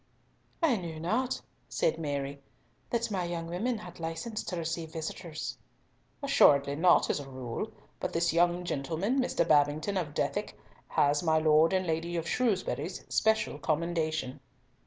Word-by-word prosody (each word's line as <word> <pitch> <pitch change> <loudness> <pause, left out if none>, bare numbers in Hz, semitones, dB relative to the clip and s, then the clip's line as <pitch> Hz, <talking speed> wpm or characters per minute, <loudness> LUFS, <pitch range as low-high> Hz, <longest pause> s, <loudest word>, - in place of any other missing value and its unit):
"I 275 -8 +4
knew 165 -4 -6
not," 225 +10 0 0.3
said 160 - +1
Mary, 140 -2 -3 0.5
"that 235 -2 -1
my 185 -3 -1 0.2
women 195 +9 -1
had 180 -5 -10
license 165 +7 -4
to 180 - -3
receive 165 -1 -3
visitors." 160 0 -5 0.6
"Assuredly 140 0 +5
not, 175 +3 +4
as - - -1
a 140 -1 -8
rule, 125 -3 -5 0.3
but - - -2
this 170 0 +1
young 175 +1 +3
gentleman, 170 - -1
Mr. 255 - +1
Babington 150 +6 +3
of 150 -5 -3
Dethick, - - -1 0.3
has 145 0 +2
my 160 -2 +3
Lord 155 +1 +5
and 190 -1 +1
Lady 165 +1 -1
of 165 0 -2
Shrewsbury's 230 -2 -1
special 220 0 +2
commendation." 155 -4 -1
165 Hz, 140 wpm, -30 LUFS, 150-185 Hz, 0.6 s, Assuredly